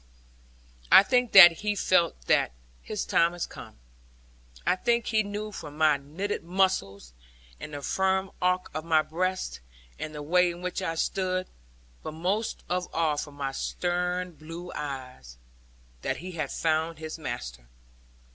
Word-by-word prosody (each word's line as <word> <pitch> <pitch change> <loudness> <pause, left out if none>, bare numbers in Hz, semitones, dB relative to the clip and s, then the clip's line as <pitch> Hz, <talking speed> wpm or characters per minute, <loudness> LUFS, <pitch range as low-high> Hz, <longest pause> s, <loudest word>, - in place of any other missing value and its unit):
I - - +10
think 250 0 +2
that 175 -4 +10
he 210 0 0
felt 170 - +1
that - - +2 0.3
his - - -4
time 170 +1 +3
was 175 - -3
come. - - -12 0.9
I - - +3
think 235 +4 +1
he 220 -2 +2
knew 210 +1 -5
from 150 -6 -9
my 155 -2 +4
knitted 160 +10 -4
muscles, 165 - 0 0.5
and 150 - -7
the 145 - -7
firm 190 +2 0
arch 180 0 +2
of 155 +1 -4
my 160 -1 +3
breast, 185 - -2 0.4
and 155 0 -5
the 150 - -6
way 180 +4 +3
in 175 +1 -7
which 180 +1 -3
I 165 -3 -2
stood; 185 +2 -1 0.6
but - - -6
most 190 +7 -2
of 180 0 -2
all 160 -2 +1
from 145 -1 -5
my 140 -1 -3
stern 180 +4 -2
blue 165 +3 -9
eyes; 130 - -7 0.6
that - - -2
he 185 +2 -7
had 155 -5 -3
found 160 0 0
his 160 +1 -7
master. - - -6
170 Hz, 155 wpm, -27 LUFS, 150-185 Hz, 0.9 s, I